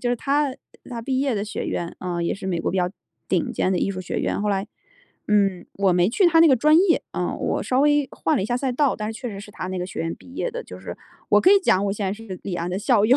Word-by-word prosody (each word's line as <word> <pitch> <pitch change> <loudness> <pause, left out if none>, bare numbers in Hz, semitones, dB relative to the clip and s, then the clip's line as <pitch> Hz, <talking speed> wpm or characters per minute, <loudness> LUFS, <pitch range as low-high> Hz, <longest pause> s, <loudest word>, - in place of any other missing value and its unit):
就 245 - -1
是 245 - +1
他 280 +1 0 0.4
他 235 -1 -5
毕 260 +2 -1
业 270 -3 +1
的 200 - -1
学 215 - -4
院， 170 0 -3
啊， 175 -2 -3
也 170 - 0
是 195 -1 -7
美 175 -3 -1
国 - - -1
比 190 - -2
较 180 - +2 0.4
顶 - - 0
尖 190 - 0
的 180 - +1
艺 195 - 0
术 185 - -5
学 180 - -3
院， - - -1
后 210 - 0
来， 195 0 0 0.6
嗯， 195 -3 +2
我 195 -2 +2
没 175 +1 +3
去 360 - +3
他 325 -1 +5
那 330 - +8
个 270 - +6
专 305 +6 +5
业， 365 -2 +3
呃， - - -2
我 - - -1
稍 255 +1 +1
微 290 -1 +3
换 160 - 0
了 - - 0
一 - - -2
下 245 - 0
赛 260 0 -1
道， 275 +1 +2
但 215 +1 -3
是 - - -9
确 245 - -4
实 200 -2 -7
是 210 - -11
他 185 - -6
那 185 -1 -3
个 180 - -3
学 - - -6
院 165 0 -2
毕 260 - -16
业 - - -2
的， 485 +1 -5
就 - - -11
是 - - -7 0.3
我 - - +6
可 370 - +5
以 405 - +8
讲， 200 - +3
我 195 - 0
现 205 -1 -3
在 190 - 0
是 210 -4 -8
李 190 - -4
安 175 +1 -3
的 185 - -2
校 210 0 +3
友。 250 +4 +5
210 Hz, 330 characters per minute, -23 LUFS, 185-265 Hz, 0.6 s, 那